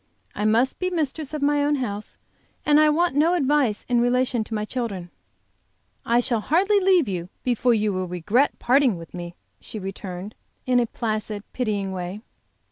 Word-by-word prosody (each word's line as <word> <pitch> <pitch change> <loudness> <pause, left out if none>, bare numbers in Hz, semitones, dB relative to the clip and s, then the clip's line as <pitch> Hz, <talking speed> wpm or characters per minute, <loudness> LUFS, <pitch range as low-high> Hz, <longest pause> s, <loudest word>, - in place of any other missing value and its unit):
I 210 - -2
must 230 +5 +2
be 365 - 0
mistress 310 -4 -2
of 305 -2 -3
my 290 0 +3
own 295 0 +2
house, 215 -6 -4 0.5
and 295 0 +5
I 305 0 +6
want 340 +2 +2
no 325 +5 +4
advice 275 -8 +1
in 240 -1 +2
relation 245 -1 +1
to 225 - -8
my 210 0 -2
children." 205 -8 -4 0.9
"I 235 +1 +3
shall 235 -2 0
hardly 380 - +3
leave 370 -5 +4
you 180 -2 -4
before 245 -1 +2
you 210 -1 0
will 185 0 -2
regret 200 - +1
parting 255 -5 +3
with 165 0 -11
me," 175 -1 -7 0.2
she - - -8
returned, 195 0 -6 0.3
in 250 -1 +3
a 240 - +1
placid, 215 -2 -3
pitying, 205 -6 -1
way. 185 +3 -5
240 Hz, 175 wpm, -24 LUFS, 205-290 Hz, 0.9 s, I